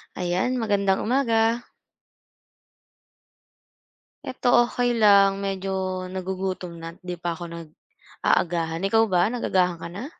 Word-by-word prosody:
Ayan, 180 Hz, +7 st, -1 dB
magandang 200 Hz, -5 st, +1 dB
umaga. 230 Hz, -1 st, +1 dB, 2.6 s
'Eto 255 Hz, -, -4 dB, 0.2 s
okey 245 Hz, 0 st, -1 dB
lang. 200 Hz, -2 st, +6 dB
Medyo 195 Hz, 0 st, -3 dB, 0.4 s
nagugutom 185 Hz, -1 st, -4 dB
na't 165 Hz, +1 st, -8 dB
di 180 Hz, -, -3 dB
pa 170 Hz, -1 st, -1 dB
ako 175 Hz, -, -8 dB
nag-aagahan. 165 Hz, +1 st, -3 dB
Ikaw 225 Hz, +3 st, +4 dB
ba 180 Hz, -1 st, +3 dB
nag-agahan 185 Hz, -7 st, 0 dB
ka -, -, -5 dB
na? 200 Hz, +8 st, -6 dB
190 Hz, 105 wpm, -24 LUFS, 175-225 Hz, 2.6 s, lang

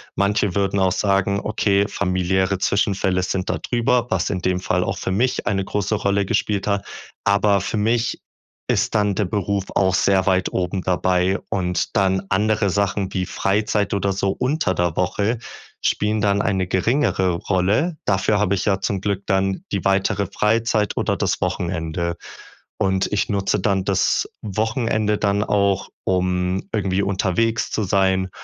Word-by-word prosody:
Manche 100 Hz, -1 st, +1 dB
würden 100 Hz, 0 st, +1 dB
auch 95 Hz, -1 st, +3 dB
sagen: 100 Hz, +1 st, +1 dB
„Okay, 100 Hz, -1 st, +1 dB
familiäre 95 Hz, 0 st, 0 dB
Zwischenfälle 95 Hz, -3 st, +1 dB
sind 95 Hz, 0 st, -2 dB
da -, -, 0 dB
drüber", 120 Hz, 0 st, 0 dB
was 95 Hz, -2 st, 0 dB
in 95 Hz, -3 st, -2 dB
dem 90 Hz, 0 st, 0 dB
Fall -, -, 0 dB
auch -, -, -3 dB
für 95 Hz, -, -3 dB
mich 120 Hz, +2 st, 0 dB
eine 95 Hz, -1 st, 0 dB
große 105 Hz, +2 st, -1 dB
Rolle 100 Hz, -1 st, +1 dB
gespielt 100 Hz, +1 st, -1 dB
hat. 100 Hz, -1 st, 0 dB, 0.4 s
Aber 100 Hz, 0 st, +3 dB
für 100 Hz, -, -3 dB
mich 115 Hz, +3 st, 0 dB, 0.5 s
ist -, -, 0 dB
dann 105 Hz, -1 st, +2 dB
der 105 Hz, -, 0 dB
Beruf 100 Hz, +1 st, -1 dB
auch 95 Hz, -1 st, +3 dB
sehr 95 Hz, -1 st, +3 dB
weit 95 Hz, -1 st, +2 dB
oben 90 Hz, +1 st, -2 dB
dabei, 90 Hz, +1 st, +1 dB
und 90 Hz, -2 st, -1 dB
dann 95 Hz, -1 st, +2 dB
andere 105 Hz, +1 st, +1 dB
Sachen 100 Hz, 0 st, -1 dB
wie 95 Hz, -1 st, -1 dB
Freizeit 100 Hz, +2 st, 0 dB
oder 100 Hz, 0 st, 0 dB
so 95 Hz, 0 st, -1 dB
unter 130 Hz, -, 0 dB
der 85 Hz, -2 st, 0 dB
Woche 105 Hz, +5 st, 0 dB, 0.4 s
spielen 105 Hz, +1 st, 0 dB
dann 100 Hz, 0 st, +2 dB
eine 95 Hz, -3 st, 0 dB
geringere 95 Hz, -1 st, +1 dB
Rolle. 100 Hz, -, 0 dB
Dafür 100 Hz, +2 st, +1 dB
habe 100 Hz, -1 st, +2 dB
ich 95 Hz, -, -2 dB
ja 100 Hz, -2 st, +2 dB
zum 95 Hz, -1 st, -1 dB
Glück 100 Hz, -1 st, -2 dB
dann 95 Hz, -1 st, 0 dB
die 100 Hz, -, -2 dB
weitere 100 Hz, +1 st, +1 dB
Freizeit 105 Hz, +1 st, 0 dB
oder -, -, +1 dB
das -, -, -1 dB
Wochenende. 85 Hz, -1 st, -2 dB, 0.6 s
Und 95 Hz, -1 st, +1 dB
ich 105 Hz, -, 0 dB
nutze 100 Hz, -1 st, 0 dB
dann 95 Hz, -1 st, 0 dB
das 100 Hz, -, +1 dB
Wochenende 110 Hz, 0 st, 0 dB
dann 100 Hz, 0 st, +1 dB
auch, 100 Hz, -3 st, +1 dB
um 90 Hz, 0 st, 0 dB
irgendwie 95 Hz, -2 st, 0 dB
unterwegs 100 Hz, +4 st, 0 dB
zu 110 Hz, -, -1 dB
sein, 95 Hz, -1 st, +1 dB
100 Hz, 160 wpm, -21 LUFS, 95-105 Hz, 0.6 s, auch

